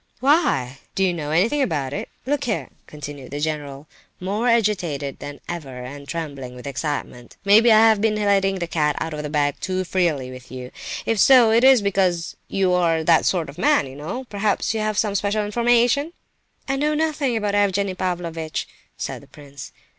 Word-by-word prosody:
"Why? 260 - +2 0.2
Do 195 - +1
you 185 -2 +2
know 155 -4 -4
anything 205 - +2
about 145 - -1
it? - - -4 0.2
Look 285 +1 -1
here," 220 -4 -2 0.2
continued 145 -3 -9
the 145 - -5
general, 145 -2 -4 0.3
more 205 +6 -1
agitated 180 - 0
than 145 0 -8
ever, 135 -7 -6
and 140 +2 -9
trembling 140 -5 -5
with 125 - -11
excitement, 140 -3 -5
"maybe 220 +4 +6
I 220 +1 +7
have 220 -2 +3
been 220 -1 +2
letting 200 -2 +2
the 175 - -2
cat 150 -3 0
out 160 - -3
of 150 - -4
the 150 - -5
bag 145 -1 0
too 185 0 -2
freely 170 -8 0
with 130 0 -12
you, 125 -1 -7 0.3
if 225 -2 0
so, 245 -1 +7
it 230 +2 +4
is 260 -4 +6
because 185 -4 0
you 190 -2 +1
are—that 165 -2 +3
sort 175 -4 0
of 140 - -11
man, - - +3
you 135 0 -10
know! 170 - -5
Perhaps 205 -2 -1
you 220 - -2
have 215 -1 -1
some 210 -2 +1
special 205 +1 0
information?" 240 +7 +2 0.5
"I 270 0 0
know 300 +2 +1
nothing 300 -6 0
about 205 -2 -1
Evgenie 200 -1 +1
Pavlovitch!" 170 -4 -3 0.3
said - - -5
the - - -17
prince. 140 -2 -11
180 Hz, 185 wpm, -22 LUFS, 145-215 Hz, 0.5 s, I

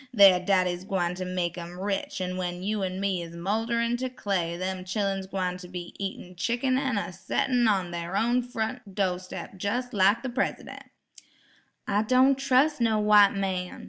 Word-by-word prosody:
Thar 195 -3 +8
daddy's 180 -1 +1
gwine 180 -3 -1
ter 185 +1 -5
make 180 -1 -2
'em 175 +1 -8
rich 195 -1 -2
an' 185 0 -2
when 180 -1 -4
you 210 +1 -1
an' 185 0 -2
me 195 -2 0
is 170 0 -8
moulderin' 230 +6 0
ter 260 +1 -3
clay 190 -8 -2
dem 185 0 -3
chillun's 195 0 -2
gwine 185 -2 -2
ter 180 - -10
be 175 -1 -7
eatin' 190 -2 -6
chickun 240 +7 0
an' 265 -5 -1
a 195 - -3
settin' 240 +6 +1
on 190 -4 +1
thar 170 +2 -3
own 240 +3 +2
front 235 -3 -5
do' 185 -3 +1
steps 185 +1 -8
jes' 245 +5 -2
like 200 +3 +3
de 265 - -2
Presidun'." 255 +2 -3 1.0
"I 205 +1 +2
don' 255 +4 +4
trus' 270 +2 +2
no' 225 -2 +3
white 210 -1 +6
man. 185 -2 -2
195 Hz, 180 wpm, -27 LUFS, 180-230 Hz, 1.0 s, Thar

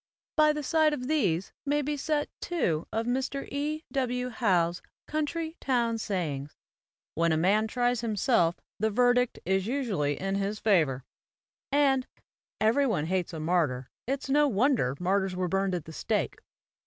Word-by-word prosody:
By 305 -1 +5
the 300 0 -3
side 315 +1 +3
of 250 -3 -4
these 195 - 0
may 290 +1 +1
be 295 +2 -1
set 295 +1 -1
two 175 - -1
of 225 +1 -1
Mr. 265 +3 -2
E. 300 +2 -2
W. 250 -2 -1
Howe's 180 -7 +1 0.2
'Country 320 +2 -3
Town 235 -3 +1
Sayings,' 150 -9 -3 0.6
"When 165 +1 +2
a 160 - +2
man 205 +6 +3
tries 245 0 0
himself, 210 -6 +2 0.2
the 220 +2 +2
verdict 245 +2 +3
is 190 +2 +1
usually 215 - -1
in 195 0 -2
his 200 +2 -1
favor"; 155 - +2 0.7
and 270 -2 +3 0.5
"Every 235 +6 +3
one 155 - 0
hates 180 +1 -1
a 165 - -6
martyr; 155 -6 0 0.2
it's 275 +2 -2
no 290 +2 +4
wonder 230 - +2
martyrs 190 +1 +1
were 180 0 -1
burned 195 0 0
at 170 -4 -4
the 160 - -10
stake.' - - -1
220 Hz, 155 wpm, -28 LUFS, 180-275 Hz, 0.7 s, By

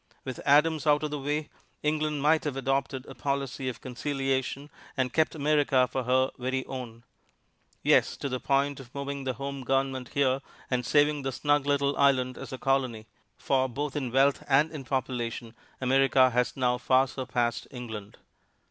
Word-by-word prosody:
With 130 -2 -5
Adams 150 +1 +4
out 150 0 +4
of 150 - -2
the 150 - -3
way, 150 +2 -2 0.4
England 150 -1 0
might 155 +1 +4
have 140 -3 -2
adopted 135 0 -1
a - - -10
policy 140 -1 -2
of 120 - -8
conciliation 135 +2 -2 0.3
and 130 -2 0
kept 160 0 +2
America 145 -4 +3
for 125 +1 -3
her 130 +1 +2
very 130 +1 -2
own 120 -3 -7 0.8
yes, - - +3
to - - -3
the 130 -1 -3
point 140 +1 +1
of 130 -1 -13
moving 140 0 -4
the 130 - 0
home 140 +2 -5
government 135 0 -1
here 135 -1 +2 0.3
and 125 -1 0
saving 145 0 +3
the 135 0 -2
snug 145 +2 +1
little 140 0 +2
island 130 -2 +3
as - - -8
a 130 - -4
colony, 130 -5 0 0.3
for 130 -1 +1
both 145 +3 -4
in 130 -5 -2
wealth 135 +2 +3
and 145 +3 +4
in 145 -4 -7
population 120 -3 -3 0.3
America 130 0 +4
has 125 +2 0
now 125 -1 +1
far 130 +2 +3
surpassed 125 -3 -2
England. 110 -5 -8
135 Hz, 170 wpm, -28 LUFS, 130-145 Hz, 0.8 s, Adams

